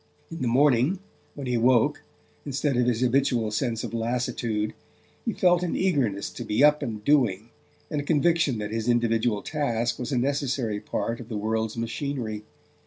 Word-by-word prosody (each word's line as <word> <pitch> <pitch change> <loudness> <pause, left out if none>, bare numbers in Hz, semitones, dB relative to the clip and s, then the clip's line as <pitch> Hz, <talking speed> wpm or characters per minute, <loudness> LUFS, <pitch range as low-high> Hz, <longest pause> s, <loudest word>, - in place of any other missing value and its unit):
In 165 - -6
the 125 - 0
morning, 135 +6 +3 0.4
when 140 - -6
he 125 -1 0
woke, 120 0 +3 0.4
instead 140 0 -1
of 125 0 +2
his 120 -1 +1
habitual 125 -3 +2
sense 115 0 -1
of - - -5
lassitude, 115 -2 -1 0.5
he - - +1
felt 175 -1 +3
an 180 - -1
eagerness 135 - 0
to - - -7
be 105 +6 +1
up 150 0 +5
and 105 -2 -5
doing, 115 -7 +2 0.4
and 150 -2 0
a - - -7
conviction 160 -3 +2
that 105 0 -4
his 115 +1 -2
individual 115 -2 +1
task 120 -6 -1
was 125 +1 -4
a 130 - +1
necessary 130 -4 0
part 115 +2 -3
of 120 - -10
the 110 - -3
world's 110 +1 -1
machinery. 115 -2 -3
120 Hz, 175 wpm, -26 LUFS, 110-140 Hz, 0.5 s, up